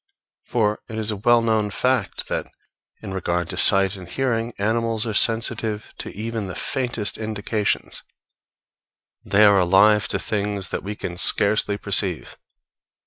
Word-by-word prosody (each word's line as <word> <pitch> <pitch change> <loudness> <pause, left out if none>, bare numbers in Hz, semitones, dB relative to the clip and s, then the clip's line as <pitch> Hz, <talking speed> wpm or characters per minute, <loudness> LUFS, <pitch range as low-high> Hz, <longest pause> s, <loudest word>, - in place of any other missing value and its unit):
For 105 -3 0
it 110 - -7
is 110 0 -1
a - - -3
well 115 +3 +2
known 110 -2 0
fact 125 0 -2
that, - - -4 0.5
in 95 - -6
regard 90 -2 -2
to - - -4
sight 95 0 +6
and 95 -2 -11
hearing, 120 -2 -2
animals 115 +2 -1
are 110 - -3
sensitive 110 -1 0
to - - -6
even 110 0 -5
the 95 - -7
faintest 120 -6 -3
indications; 110 -1 -3 1.2
they 105 +2 +3
are 100 -1 +5
alive 100 +4 +4
to - - 0
things 100 -2 -3
that - - -4
we 105 +2 -6
can 90 -3 -7
scarcely 100 +2 +3
perceive. 95 -4 -1
105 Hz, 145 wpm, -22 LUFS, 100-115 Hz, 1.2 s, sight